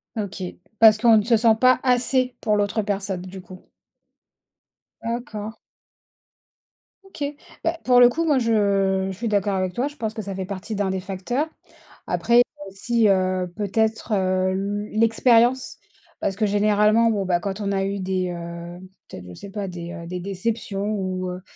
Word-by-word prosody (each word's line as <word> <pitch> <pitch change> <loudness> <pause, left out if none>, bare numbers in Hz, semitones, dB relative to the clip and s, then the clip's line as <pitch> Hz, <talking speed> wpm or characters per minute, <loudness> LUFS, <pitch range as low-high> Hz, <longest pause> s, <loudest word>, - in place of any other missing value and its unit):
OK. 200 -3 -4 0.4
Parce 220 -1 +8
qu'on 225 0 +5
ne 210 - +2
se 230 +1 +3
sent 225 0 +4
pas 255 0 +5
assez 255 0 +1
pour 210 - +1
l'autre 205 +1 0
personne, 195 -3 -3
du 185 +1 -9
coup. 185 0 -14 1.4
D'accord. 225 -2 -5 1.5
OK. 385 -6 -8 0.4
Bah, 330 +1 0
pour 250 -1 +5
le 245 0 +8
coup, 330 +7 -1
moi, 295 -4 +3
je 200 -4 +1
je - - -7
suis 235 +3 -3
d'accord 205 -1 +1
avec 185 -1 -1
toi. 250 +8 -1
Je 290 - -9
pense 220 -6 -4
que 220 - -5
ça 195 -2 -6
fait 190 - -4
partie 200 +3 -6
d'1 200 -1 0
des 190 0 -1
facteurs. 195 +10 -3 0.6
Après, 240 +1 +4 0.3
si 230 +3 +1
heu, 185 -2 +1
peut-être 220 +2 -1
heu, 185 -1 +1 0.4
l 215 - -2
l'expérience 235 +2 +3 0.4
parce 195 - -1
que 215 +1 +1
généralement, 210 +2 +3
bon 200 -3 -1
bah, 180 -2 +1
quand 195 +3 -4
on 200 -1 -1
a 195 -1 0
eu 200 +1 -3
des 185 -1 -1
heu, 170 0 -7 0.3
peut-être 90 - -9
je 90 - -10
sais 200 - -10
pas 205 -1 -4
des 175 -1 -7
des 180 +1 -4
déceptions 200 +1 -3
ou 185 -2 -3
heu, 180 +1 -7
205 Hz, 175 wpm, -23 LUFS, 185-230 Hz, 1.5 s, Parce